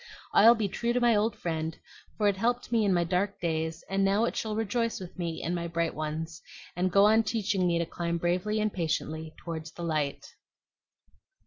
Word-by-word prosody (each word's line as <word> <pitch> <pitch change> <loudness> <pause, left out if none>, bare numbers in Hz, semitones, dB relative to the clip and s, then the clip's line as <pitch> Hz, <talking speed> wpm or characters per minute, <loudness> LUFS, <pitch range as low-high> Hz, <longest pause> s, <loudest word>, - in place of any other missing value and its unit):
"I'll 230 +3 +8
be 220 -3 0
true 235 +5 -1
to 250 - +2
my 240 -2 +4
old 210 +1 +1
friend; 160 -1 -3 0.4
for 210 - +2
it 200 - +3
helped 240 +3 0
me 230 -2 +3
in 200 - +2
my 175 -2 +3
dark 185 +4 -1
days, 160 -1 -2
and 195 0 0
now 200 +3 +3
it - - -2
shall 215 -1 -2
rejoice 230 +1 -1
with 185 -2 -9
me 170 -2 -3
in 170 - -1
my 170 -1 -2
bright 170 -1 -1
ones, 155 +1 -4 0.3
and 180 +1 0
go 200 +2 +6
on 220 +2 +5
teaching 210 -4 0
me 170 -1 +2
to 170 - 0
climb 170 +1 -2
bravely 180 +5 0
and 215 -1 0
patiently 160 -2 -2
toward 160 -2 -6
the 170 - -6
light." 155 -4 -1
180 Hz, 205 wpm, -29 LUFS, 165-215 Hz, 0.4 s, I'll